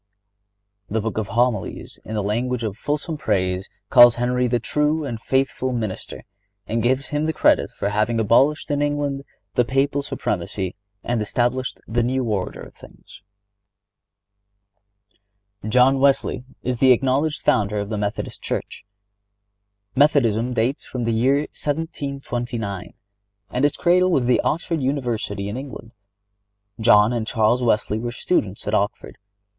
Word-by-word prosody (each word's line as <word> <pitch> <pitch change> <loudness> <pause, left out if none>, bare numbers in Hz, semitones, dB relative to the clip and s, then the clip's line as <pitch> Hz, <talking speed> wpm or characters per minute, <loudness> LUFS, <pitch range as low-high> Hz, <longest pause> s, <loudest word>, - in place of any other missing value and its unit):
(97) - - -7
The 110 - +2
Book 110 - -4
of 105 - -3
Homilies, 120 -4 -1
in 110 - -6
the 105 - -1
language 120 +4 -1
of 105 -3 -3
fulsome 150 +6 -3
praise, 95 -7 -1 0.2
calls 120 -1 +8
Henry 125 +1 +1
"the 120 0 +1
true 150 +5 0
and 115 -5 -5
faithful 130 0 0
minister," 110 -5 -4 0.4
and 115 +3 -1
gives 130 +4 0
him 150 0 -1
the 160 - 0
credit - - +3
for 100 - -3
having 110 +3 0
abolished 135 +9 +3
in 145 0 0
England 145 -1 -1 0.3
the 125 - +3
Papal 135 +3 +1
supremacy 95 -8 -3 0.3
and 120 -2 -1
established 120 +4 -1
the 120 +2 0
new 130 +2 0
order 105 -5 -2
of - - -11
things.(98) 100 0 -19
John 130 +3 +4
Wesley 135 -2 +2 0.2
is 125 0 -1
the 130 -1 +7
acknowledged 135 +5 0
founder 105 0 +2
of 100 0 -3
the 110 - -2
Methodist 105 0 -4
Church. - - -4 1.1
Methodism 125 -5 +3
dates 120 +5 0
from 125 -2 -5
the 115 0 0
year 130 +5 +3
1729, 130 - -4 0.6
and 125 - -1
its 145 - +1
cradle 180 +1 +3
was 135 -8 +2
the 125 - +3
Oxford 165 -1 -1
University 120 -7 -2
in 105 +4 -4
England. 130 -4 -8 0.9
John 110 0 +5
and 115 -2 -2
Charles 115 +2 +2
Wesley 110 -2 +1
were 120 +1 -3
students 105 - -1
at 105 - -1
Oxford. 100 -1 -1
120 Hz, 145 wpm, -22 LUFS, 105-135 Hz, 1.1 s, calls